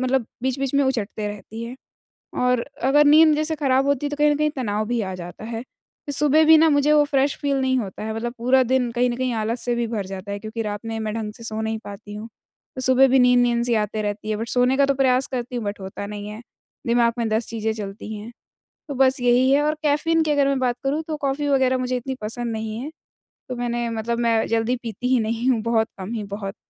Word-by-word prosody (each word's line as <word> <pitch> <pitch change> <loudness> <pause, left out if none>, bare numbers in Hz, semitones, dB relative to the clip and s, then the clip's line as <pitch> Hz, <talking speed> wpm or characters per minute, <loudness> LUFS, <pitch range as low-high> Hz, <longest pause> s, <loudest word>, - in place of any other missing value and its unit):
मतलब 255 -2 +1 0.2
बीच-बीच 265 +1 -1
में 280 - +4
उचटते 220 -5 -2
रहती 210 +2 -8
है। 240 +2 -7 0.7
और 250 -1 +2 0.2
अगर 295 +2 +5
नींद 310 +1 +7
जैसे 310 +1 -1
खराब 270 -2 +2
होती 285 0 0
तो 290 - -5
कहीं 295 0 +4
न 295 - +1
कहीं 300 0 +1
तनाव 215 -4 -1
भी 240 0 -1
आ 190 -2 -4
जाता 175 +3 -9
है। 225 0 -4
फिर 285 +2 -12
सुबह 300 +2 +4
भी 320 0 +8
ना 320 +1 +5
मुझे 285 +1 +3
वो 295 -1 +5
फ्रेश 280 -1 +1
फील 280 -1 0
नहीं 260 0 +1
होता 200 -5 -5
है, 220 - -3
मतलब 235 +1 -4
पूरा 255 +3 +4
दिन 250 0 +1
कहीं 245 +1 +1
न 240 - -3
कहीं 255 -1 -1
आलस 225 +2 -1
से 240 -1 0
भी 235 -1 -1
भर 210 -4 -3
जाता 195 +1 -6
है 200 - -3
क्योंकि 220 +2 -5
रात 205 -1 -4
में 225 0 -3
मैं 215 -1 -3
ढंग 220 -2 -4
से 230 - -11
सो 220 -1 -3
नहीं 220 0 -2
पाती 205 +1 -9
हूँ 215 +2 -7 0.5
तो 260 - -3
सुबह 260 +1 +5
भी 265 +1 +4
नींद-नींद 245 -1 +4
सी 235 - +2
आते 215 0 -1
रहती 210 +1 -4
है। 215 - 0
बट 225 +2 -4
सोने 250 +1 +2
का 280 0 +4
तो 275 - +2
प्रयास 260 -1 +2
करती 245 -1 -3
हूँ 235 - -3
बट 205 0 -4
होता 190 +1 -6
नहीं 205 0 -7
है। 210 +1 -8 0.5
दिमाग 235 0 +3
में 230 - 0
10 220 +1 0
चीज़ें 220 -1 -2
चलती 210 +1 -7
हैं, 215 +3 -8 0.6
तो 285 - -4
बस 265 0 +3
यही 245 +1 +4
है 280 +2 +4
और 305 +1 +1
कैफ़ीन 320 +2 +2
की 310 - -1
अगर 280 -1 +3
मैं 275 - +1
बात 250 -2 0
करूँ 285 +4 0
तो 310 - -2
कॉफ़ी 285 0 -2
वगैरह 260 -2 +2
मुझे 255 0 -1
इतनी 265 +2 -4
पसंद 230 +2 -3
नहीं 220 0 -4
है। 290 - -5 0.6
तो 250 - -3
मैंने 240 -1 -2
मतलब 230 +1 -2
मैं 230 -2 +2
जल्दी 230 +2 +1
पीती 230 +1 -4
ही 255 - +4
नहीं 230 +3 -1
हूँ, 230 -3 0
बहुत 225 -1 +1
कम 190 +4 -6
ही, 220 -3 -3
बहुत 200 +1 -6
240 Hz, 250 wpm, -22 LUFS, 220-270 Hz, 0.7 s, भी